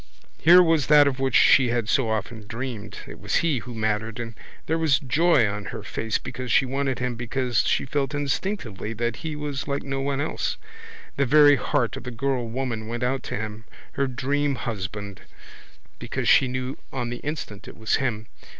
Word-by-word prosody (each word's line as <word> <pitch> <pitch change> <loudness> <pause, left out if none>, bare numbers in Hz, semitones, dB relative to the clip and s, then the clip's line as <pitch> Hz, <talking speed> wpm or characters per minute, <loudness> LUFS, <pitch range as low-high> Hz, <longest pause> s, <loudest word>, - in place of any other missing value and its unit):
Here 175 +3 +8
was 160 -5 +2
that 150 -1 +7
of 135 -1 -1
which 135 -2 0
she 130 -3 +6
had 120 -2 0
so 115 0 +2
often 110 0 -3
dreamed. 115 -2 -6
It - - -10
was - - -2
he 150 -7 +2
who 120 +1 -9
mattered 110 +1 -1
and 115 -1 -5 0.3
there 160 +1 0
was 155 -4 +3
joy 150 -3 +3
on 100 0 -4
her - - -6
face 110 -1 -2
because 125 0 -6
she 135 - +4
wanted 135 0 -1
him 125 -1 -2
because 120 +1 -1
she - - +1
felt 140 +1 -1
instinctively 140 - -3
that 120 +1 -2
he 160 -2 -5
was 145 -2 -4
like 140 0 -2
no 135 0 -3
one 140 0 -1
else. 145 - -2 0.6
The 140 -1 +2
very 145 +1 +7
heart 120 -3 0
of - - -8
the - - -3
girlwoman 120 -2 -2
went 120 +2 -3
out 130 +2 0
to - - -3
him, 110 +1 -6 0.3
her 140 - 0
dreamhusband, 120 -7 -2 0.8
because - - -3
she 130 - +6
knew 130 +1 -4
on 120 -3 -3
the 120 - -4
instant 130 -8 -6
it - - -11
was 110 -1 +1
him. 115 -5 -2
125 Hz, 185 wpm, -25 LUFS, 115-140 Hz, 0.8 s, Here